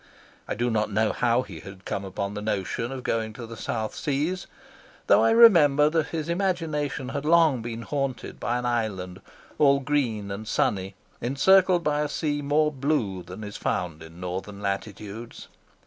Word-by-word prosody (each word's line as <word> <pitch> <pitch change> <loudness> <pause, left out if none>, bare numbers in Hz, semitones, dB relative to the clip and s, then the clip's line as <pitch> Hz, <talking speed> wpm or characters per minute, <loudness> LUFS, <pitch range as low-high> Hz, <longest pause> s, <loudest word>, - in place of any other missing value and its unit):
I - - -2
do 120 +3 0
not 105 -1 0
know 110 +1 +2
how 120 +1 +2
he - - -10
had 95 0 -12
come 100 - -3
upon 100 +1 -4
the 105 - -5
notion 105 +3 -2
of 130 -1 -6
going 110 -1 -1
to 115 +2 -8
the 115 0 -9
South 110 -1 -3
Seas, 150 +6 -2 0.6
though - - +5
I - - +5
remember 160 -11 +6
that 160 -2 +1
his 160 -2 -4
imagination 165 -7 -1
had 140 +1 -3
long 160 -5 +4
been 115 0 -5
haunted 135 -1 -3
by 120 - -1
an 125 - -3
island, 100 -6 -2 0.4
all 140 -2 +5
green 125 -8 -1
and 105 +2 -6
sunny, 95 -2 0 0.3
encircled 175 +8 +4
by 150 -1 +1
a 150 - -1
sea 145 -1 -1
more 150 +2 +2
blue 130 -10 -1
than 90 +5 -9
is 105 -1 -6
found 85 -4 -2
in 80 +2 -12
Northern 95 +3 -5
latitudes. 105 +3 -5
120 Hz, 175 wpm, -26 LUFS, 105-150 Hz, 0.6 s, remember